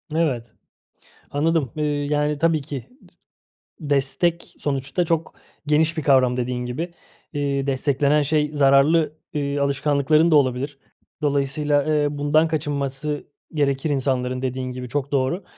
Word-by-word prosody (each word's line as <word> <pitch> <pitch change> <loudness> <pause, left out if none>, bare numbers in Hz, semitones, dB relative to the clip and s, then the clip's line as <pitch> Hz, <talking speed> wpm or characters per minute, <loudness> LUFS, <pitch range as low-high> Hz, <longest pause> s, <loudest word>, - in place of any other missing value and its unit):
Evet, 125 -9 -1 0.8
anladım, 150 -3 +1
ııı, 150 - 0
yani 150 0 0
tabii 165 0 +2
ki 135 -2 -6 0.9
d 150 -4 -7
destek 165 +5 0
sonuçta 135 +4 -1
çok 165 0 -1 0.3
geniş 160 +2 +2
bir 160 - -1
kavram, 130 -3 +4
dediğin 125 0 -2
gibi. 160 +8 -4 0.4
Iıı, 140 -2 -1
desteklenen 140 +2 +2
şey 150 0 +1
zararlı, 145 +2 +4 0.2
ııı, 140 -1 -1
alışkanlıkların 145 +3 +2
da - - +6
olabilir. 135 0 +1 0.4
Dolayısıyla, 145 0 +1
ııı, 150 -1 0
bundan 150 +3 +3
kaçınması 145 -1 -3 0.3
gerekir 140 -1 0
insanların, 130 -2 -1
dediğin 130 0 -3
gibi, 125 0 -7
çok 140 +2 -2
doğru. 140 +7 0
145 Hz, 125 wpm, -22 LUFS, 135-150 Hz, 0.9 s, da